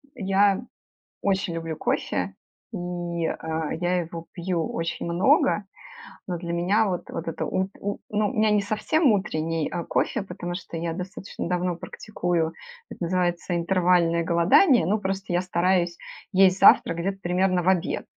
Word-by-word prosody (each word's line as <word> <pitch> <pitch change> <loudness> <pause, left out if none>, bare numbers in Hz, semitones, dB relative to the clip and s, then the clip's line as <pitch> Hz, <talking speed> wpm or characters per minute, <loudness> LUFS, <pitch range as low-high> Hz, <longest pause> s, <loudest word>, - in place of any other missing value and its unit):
Я 200 +1 +2 0.6
очень 190 -3 0
люблю 165 -1 -4
кофе, 90 -8 -1 0.4
и, - - -5
э, 170 -3 -3
я 180 +1 +1
его 165 0 -7
пью 175 -2 -2
очень 165 0 -3
много, 170 +2 +3 0.6
но 180 - -2
для 170 0 -5
меня 195 +6 +2
вот 180 -2 -2
вот 165 - -5
это 165 - -3
ут 190 +1 -1
у 205 0 -3
ну, 210 0 +1
у - - -7
меня 215 -2 +3
не 210 -1 +3
совсем 240 +8 +2
утренний, 165 -5 -1
э, 170 - -3
кофе, 210 - 0
потому 180 -2 -6
что 175 -3 -7
я 165 0 -2
достаточно 185 +2 -6
давно 180 -1 0
практикую- 175 -3 -2 0.4
это - - -7
называется 175 0 0
интервальное 170 -1 +2
голодание: 170 - +4
ну, 210 +5 +1
просто 195 -2 -3
я 175 - +2
стараюсь 175 -1 +1 0.4
есть 190 0 +5
завтрак 165 - +6
где-то 195 +3 -2
примерно 180 +1 +1
в 185 - +3
обед. 185 -2 0
180 Hz, 155 wpm, -25 LUFS, 170-195 Hz, 0.6 s, завтрак